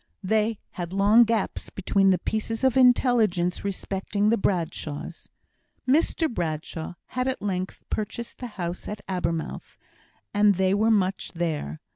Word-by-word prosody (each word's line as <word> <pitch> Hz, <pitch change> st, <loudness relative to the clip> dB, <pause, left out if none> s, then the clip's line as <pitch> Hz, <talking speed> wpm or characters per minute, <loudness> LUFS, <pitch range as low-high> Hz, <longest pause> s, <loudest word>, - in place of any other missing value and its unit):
They 220 Hz, +2 st, +1 dB
had 175 Hz, 0 st, -5 dB
long 205 Hz, +4 st, +6 dB
gaps 225 Hz, -3 st, -1 dB
between 195 Hz, 0 st, +2 dB
the 185 Hz, -, +4 dB
pieces 220 Hz, +4 st, -3 dB
of 260 Hz, -2 st, +3 dB
intelligence 235 Hz, -8 st, +3 dB
respecting 200 Hz, +1 st, -1 dB
the 230 Hz, -, +4 dB
Bradshaws. 170 Hz, -7 st, -3 dB, 0.6 s
Mr 320 Hz, +4 st, +3 dB
Bradshaw 165 Hz, -, -4 dB
had 255 Hz, +1 st, -1 dB
at 260 Hz, -, -1 dB
length 185 Hz, -2 st, -3 dB
purchased 215 Hz, +2 st, -4 dB
the 250 Hz, -, -5 dB
house 175 Hz, -1 st, -4 dB
at 210 Hz, -1 st, -6 dB
Abermouth, 170 Hz, -3 st, -3 dB, 0.6 s
and 205 Hz, -1 st, +4 dB
they 190 Hz, +1 st, +2 dB
were 215 Hz, +3 st, +3 dB
much 195 Hz, -3 st, +1 dB
there. 155 Hz, -, -2 dB
200 Hz, 135 wpm, -26 LUFS, 180-225 Hz, 0.6 s, long